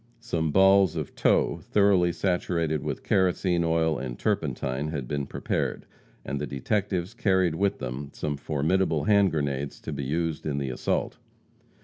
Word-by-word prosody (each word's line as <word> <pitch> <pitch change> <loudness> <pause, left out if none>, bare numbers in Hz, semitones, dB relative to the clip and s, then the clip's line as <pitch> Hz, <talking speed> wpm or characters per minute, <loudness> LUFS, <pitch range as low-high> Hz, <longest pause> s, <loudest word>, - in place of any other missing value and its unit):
Some 85 -9 -1
balls 95 -1 +5
of 75 -4 -4
tow - - +2
thoroughly 100 -4 +3
saturated 85 -4 -1
with - - -4
kerosene 90 -2 +2
oil 80 -2 +1
and 60 -2 -5
turpentine 65 +4 -1
had 70 -5 -4
been 70 0 -2
prepared, - - -2 0.4
and 70 - -3
the 75 - -2
detectives 95 - -2
carried 95 -6 +2
with 100 +4 0
them 65 +2 -5
some 75 -1 -3
formidable 75 +6 0
hand 100 -2 +4
grenades 70 -3 -2
to - - -5
be 70 - -4
used 80 +3 -2
in 70 -2 -1
the 70 -2 -2
assault. 60 - -2
80 Hz, 150 wpm, -26 LUFS, 70-95 Hz, 0.4 s, balls